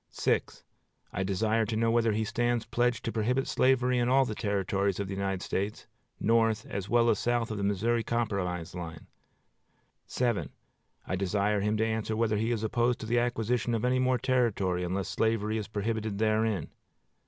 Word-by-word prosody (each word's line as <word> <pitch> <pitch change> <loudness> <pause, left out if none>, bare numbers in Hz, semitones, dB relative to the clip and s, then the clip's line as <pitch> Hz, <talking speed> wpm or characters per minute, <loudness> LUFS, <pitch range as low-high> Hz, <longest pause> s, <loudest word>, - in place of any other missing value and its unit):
I 95 - -2
desire 110 +4 +1
to 110 - -2
know 115 +1 +2
whether 115 -1 +3
he 110 +1 0
stands 120 +1 0
pledged 120 +1 0
to 115 - -1
prohibit 125 +5 0
slavery 125 -1 +2
in 120 0 +1
all 135 +1 +4
the 110 - -3
Territories 100 -2 -1
of 100 - -2
the 95 - -4
United 95 -1 -2
States, 100 +2 -3 0.3
north 115 0 +2
as 100 0 -5
well 120 0 +4
as 105 - 0
south 120 -1 0
of 110 - -3
the - - -2
Missouri 110 +4 +1
Compromise 100 -8 -2
line. 85 -3 -7 2.0
I 95 - -1
desire 100 +2 0
him 105 +1 +1
to 110 - +2
answer 110 0 -1
whether 110 -2 +1
he 110 +2 0
is 115 -2 -1
opposed 120 +2 +1
to - - -4
the 120 +2 +2
acquisition 120 0 0
of 115 +1 -1
any 130 +1 +2
more 130 0 +2
territory 115 -9 +1
unless 95 +2 -2
slavery 110 -1 0
is 105 - -5
prohibited 110 0 -2
therein. 110 -4 +1
110 Hz, 175 wpm, -29 LUFS, 100-120 Hz, 2.0 s, all